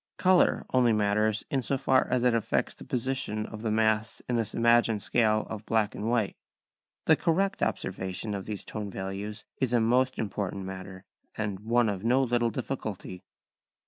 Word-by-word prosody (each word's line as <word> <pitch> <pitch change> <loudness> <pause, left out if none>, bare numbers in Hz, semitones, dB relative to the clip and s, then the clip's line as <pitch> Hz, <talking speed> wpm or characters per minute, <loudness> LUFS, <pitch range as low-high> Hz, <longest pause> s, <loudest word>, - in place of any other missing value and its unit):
Colour 185 -1 +4
only 125 -3 +4
matters 105 +1 +1
in 135 - +1
so 135 +2 0
far 130 0 +3
as 125 -1 +1
it 125 -1 +4
affects 115 -2 0
the - - -12
position 125 -4 -2
of 110 -1 -8
the 110 - -1
mass 110 0 +1
in 125 - 0
this 115 -2 -1
imagined 115 -3 +3
scale 110 -2 +2
of 110 -1 -6
black 110 -2 +1
and 110 +2 -3
white. 115 -5 +1 0.7
The - - +6
correct 195 +4 0
observation 95 +3 -2
of 100 -1 -5
these 105 -2 -5
tone 105 -2 -5
values 100 +2 -5
is 130 -2 0
a 120 - +5
most 125 +3 +2
important 100 -2 -3
matter, 95 0 -8 0.3
and 105 -3 -2
one 115 +2 +2
of 100 -2 -2
no 125 +3 +3
little 120 -1 +1
difficulty. 110 -6 -5
110 Hz, 175 wpm, -28 LUFS, 105-120 Hz, 0.7 s, The